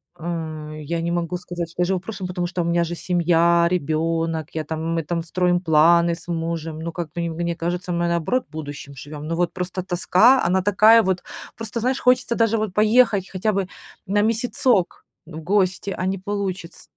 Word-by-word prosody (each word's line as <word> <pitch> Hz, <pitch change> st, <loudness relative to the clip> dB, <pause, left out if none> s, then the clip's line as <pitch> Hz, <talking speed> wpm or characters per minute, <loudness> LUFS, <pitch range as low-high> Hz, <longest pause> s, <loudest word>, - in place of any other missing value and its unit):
ам, 155 Hz, -2 st, -5 dB
я 165 Hz, +3 st, -3 dB
не 170 Hz, +1 st, -2 dB
могу 175 Hz, 0 st, -2 dB
сказать, 175 Hz, -1 st, -6 dB
что 180 Hz, -, -4 dB
я -, -, +3 dB
живу 190 Hz, 0 st, 0 dB
прошлым, 190 Hz, -1 st, -6 dB
потому 180 Hz, -1 st, -2 dB
что 180 Hz, 0 st, -3 dB
у -, -, -2 dB
меня 170 Hz, 0 st, +2 dB
же 170 Hz, +1 st, -4 dB
семья, 170 Hz, -1 st, +3 dB
ребёнок, 165 Hz, 0 st, 0 dB
я 160 Hz, -1 st, -2 dB
там, 160 Hz, 0 st, -5 dB, 0.2 s
мы -, -, -3 dB
там 170 Hz, +1 st, -2 dB
строим 175 Hz, +1 st, +1 dB
планы 170 Hz, 0 st, +4 dB
с 175 Hz, -, -15 dB
мужем, 165 Hz, -2 st, -3 dB
ну, 165 Hz, +1 st, -4 dB
как 165 Hz, -3 st, -5 dB
бы, 170 Hz, -, -3 dB
не 170 Hz, -, -2 dB
мне 170 Hz, 0 st, -1 dB
кажется, 175 Hz, +1 st, -3 dB
мы, 170 Hz, 0 st, 0 dB
наоборот, 170 Hz, +10 st, 0 dB
будущим 145 Hz, -2 st, -7 dB
живём. 145 Hz, +2 st, -9 dB
Но 165 Hz, -, -2 dB
вот 175 Hz, 0 st, 0 dB
просто 180 Hz, 0 st, -4 dB
тоска, 190 Hz, +8 st, +4 dB
она 185 Hz, +2 st, +2 dB
такая 215 Hz, +4 st, +6 dB
вот, 185 Hz, -1 st, 0 dB, 0.3 s
просто, 225 Hz, +1 st, -5 dB
знаешь, 255 Hz, +3 st, 0 dB
хочется 250 Hz, -1 st, +2 dB
даже 225 Hz, -1 st, +2 dB
вот 215 Hz, -4 st, -2 dB
поехать 215 Hz, -2 st, +3 dB
хотя 205 Hz, +3 st, 0 dB
бы 195 Hz, -2 st, -1 dB, 0.4 s
на 205 Hz, +1 st, +2 dB
месяцок 230 Hz, -3 st, +1 dB, 0.2 s
в 160 Hz, -1 st, -9 dB
гости, 190 Hz, +1 st, 0 dB
а 185 Hz, -, -2 dB
не 195 Hz, +1 st, -1 dB
получится. 195 Hz, -3 st, -4 dB
175 Hz, 200 wpm, -22 LUFS, 165-195 Hz, 0.4 s, такая